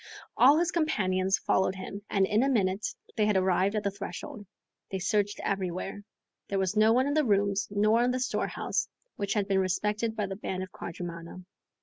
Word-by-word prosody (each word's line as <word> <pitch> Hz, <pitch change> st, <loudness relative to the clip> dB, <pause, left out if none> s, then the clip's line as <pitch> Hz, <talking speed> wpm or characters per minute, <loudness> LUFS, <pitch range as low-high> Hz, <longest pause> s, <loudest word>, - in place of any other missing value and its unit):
All 275 Hz, +5 st, +6 dB
his 345 Hz, +1 st, +1 dB
companions 190 Hz, -, +1 dB
followed 190 Hz, 0 st, +1 dB
him, 195 Hz, +2 st, -7 dB
and 195 Hz, -1 st, +3 dB
in 210 Hz, +3 st, +2 dB
a 270 Hz, -, +2 dB
minute 200 Hz, -4 st, +1 dB, 0.3 s
they 210 Hz, -1 st, +2 dB
had 210 Hz, -2 st, +3 dB
arrived 190 Hz, +2 st, +2 dB
at 210 Hz, -, -1 dB
the 200 Hz, -, 0 dB
threshold. 200 Hz, +1 st, -7 dB, 0.4 s
They 190 Hz, -, -2 dB
searched 205 Hz, +2 st, 0 dB
everywhere. 195 Hz, +1 st, -3 dB, 0.4 s
There 200 Hz, -, -2 dB
was 190 Hz, +1 st, 0 dB
no 215 Hz, +1 st, +5 dB
one 255 Hz, +3 st, +3 dB
in 285 Hz, -, 0 dB
the 305 Hz, 0 st, +3 dB
rooms 200 Hz, -3 st, +1 dB
nor 215 Hz, +3 st, +3 dB
in 245 Hz, -, +2 dB
the 255 Hz, +1 st, 0 dB
storehouse, 255 Hz, -, -1 dB, 0.3 s
which 200 Hz, 0 st, -2 dB
had 205 Hz, -2 st, 0 dB
been 195 Hz, -1 st, +2 dB
respected 210 Hz, +4 st, 0 dB
by 210 Hz, -, -1 dB
the 195 Hz, 0 st, -5 dB
band 190 Hz, -1 st, -4 dB
of 185 Hz, -, -9 dB
quadrumana. 170 Hz, +1 st, -7 dB
200 Hz, 195 wpm, -29 LUFS, 190-215 Hz, 0.4 s, All